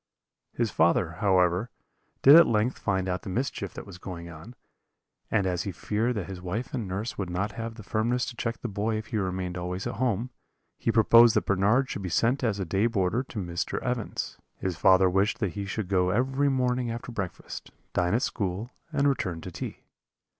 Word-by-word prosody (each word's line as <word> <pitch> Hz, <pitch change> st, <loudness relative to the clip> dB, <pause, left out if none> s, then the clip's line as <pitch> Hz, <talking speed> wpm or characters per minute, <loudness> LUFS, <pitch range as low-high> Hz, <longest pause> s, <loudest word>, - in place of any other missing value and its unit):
"His 115 Hz, -4 st, 0 dB
father, 85 Hz, -1 st, +2 dB
however, 95 Hz, +1 st, +3 dB, 0.5 s
did 140 Hz, +3 st, +10 dB
at 170 Hz, -, +9 dB
length 115 Hz, +3 st, +1 dB
find 95 Hz, -3 st, 0 dB
out 90 Hz, 0 st, -1 dB
the -, -, -7 dB
mischief 100 Hz, -2 st, -3 dB
that -, -, -7 dB
was 95 Hz, -3 st, -11 dB
going 85 Hz, -2 st, -7 dB
on; 85 Hz, +10 st, -11 dB, 0.7 s
and 100 Hz, -4 st, +2 dB
as 90 Hz, -1 st, 0 dB
he 100 Hz, -, -3 dB
feared 110 Hz, +7 st, -1 dB
that 100 Hz, -5 st, -2 dB
his 95 Hz, -1 st, -7 dB
wife 95 Hz, +7 st, -4 dB
and 110 Hz, -5 st, -2 dB
nurse 100 Hz, +6 st, -4 dB
would 95 Hz, -3 st, -2 dB
not 95 Hz, +4 st, -1 dB
have 115 Hz, +2 st, -5 dB
the 110 Hz, -, -10 dB
firmness 115 Hz, +4 st, 0 dB
to 120 Hz, -, -7 dB
check 115 Hz, -1 st, -2 dB
the -, -, -3 dB
boy 105 Hz, +1 st, -1 dB
if 110 Hz, -1 st, -6 dB
he -, -, +2 dB
remained 90 Hz, -2 st, -2 dB
always 90 Hz, +2 st, -4 dB
at -, -, -4 dB
home, 125 Hz, 0 st, 0 dB, 0.5 s
he 115 Hz, -, +1 dB
proposed 115 Hz, +1 st, +6 dB
that 110 Hz, -, +2 dB
Bernard 105 Hz, +7 st, +3 dB
should 100 Hz, -, -5 dB
be 95 Hz, -, -4 dB
sent 120 Hz, -, +1 dB
as 105 Hz, -4 st, 0 dB
a 95 Hz, -, -1 dB
day 100 Hz, +6 st, +2 dB
boarder 100 Hz, 0 st, +1 dB
to 130 Hz, -3 st, -10 dB
Mr. 85 Hz, -2 st, -2 dB
Evans. 125 Hz, -2 st, -3 dB, 0.2 s
His 95 Hz, -2 st, -2 dB
father 95 Hz, +2 st, +5 dB
wished 95 Hz, +3 st, +2 dB
that 100 Hz, -, 0 dB
he 100 Hz, -1 st, -4 dB
should 100 Hz, 0 st, -3 dB
go 90 Hz, -1 st, +2 dB
every 135 Hz, +7 st, +1 dB
morning 125 Hz, -2 st, 0 dB
after 115 Hz, +2 st, -5 dB
breakfast, 95 Hz, -6 st, -6 dB, 0.2 s
dine 90 Hz, +3 st, +2 dB
at 120 Hz, -, +1 dB
school, 100 Hz, +3 st, -2 dB, 0.2 s
and 145 Hz, -2 st, +2 dB
return 95 Hz, -11 st, 0 dB
to 90 Hz, -, -7 dB
tea. -, -, -6 dB
105 Hz, 205 wpm, -27 LUFS, 90-120 Hz, 0.7 s, did